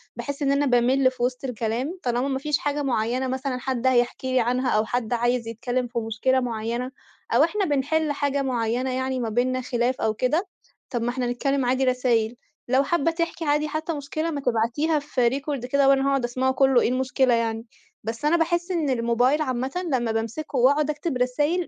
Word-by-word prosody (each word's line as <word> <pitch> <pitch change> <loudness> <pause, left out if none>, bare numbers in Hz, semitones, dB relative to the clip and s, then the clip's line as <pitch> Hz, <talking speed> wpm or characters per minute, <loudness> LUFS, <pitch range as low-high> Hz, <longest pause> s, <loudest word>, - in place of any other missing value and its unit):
باحِس 285 +1 -5
إن 275 -1 +2
أنا 285 +1 +2
بامِل 255 +1 +3
في 245 -1 -5
وِسط 250 +1 -1
الكلام، 250 - -3
طالما 245 +2 0
ما 265 -1 -1
فيش 300 0 0
حاجة 290 0 -2
معيّنة 250 0 0
مثلًا 260 0 -2
حد 260 -1 -1
هيحكي 255 +1 +1
لي 255 - +4
عنها 250 +2 +1
أو 215 -1 +2
حد 245 0 -2
عايز 240 0 0
يتكلّم 245 +2 -2
في 235 0 -3
مشكلة 230 +4 +1
معيّنة 235 +1 -3 0.4
أو - - +6
إحنا 420 -2 +1
بنحِل 295 +1 +1
حاجة 285 -1 0
معيّنة 250 0 -1
يعني 260 0 -1
ما 235 -2 -2
بيننا 255 +3 0
خلاف 245 0 -1
أو 220 - +1
كده، 295 - 0 0.4
طب 240 -3 -2
ما 235 - 0
إحنا 250 0 -2
نتكلّم 275 +2 0
عادي 255 +2 +1
رسايل. 245 -3 +1 0.3
لو 260 +2 +3
حابّة 330 +1 +1
تحكي 335 0 -3
عادي 295 +1 +1
حتّى 310 +2 -3
مشكلة 310 +3 -3
ما 285 -2 -3
تبعتيها 250 +7 +1
في 260 -4 +1
record 275 0 -3
كده 275 +1 +3
وأنا 275 0 +3
هاقعُد 275 -2 +1
أسمعه 255 +2 0
كُلّه 265 -2 +4
إيه - - +2
المشكلة 255 0 +1
يعني؟ 225 -1 -1 0.4
بس 225 +5 -4
أنا 335 +3 +4
باحِس 345 +2 0
إن 325 -5 0
الموبايل 245 +4 +2
عامةً 260 -2 -2 0.2
لمّا 240 -3 +1
بامسكه 230 +6 -3
وأقعُد 285 +4 +3
أكتب 300 -2 -2
رسايل، 295 +8 0
260 Hz, 195 wpm, -24 LUFS, 240-285 Hz, 0.4 s, أو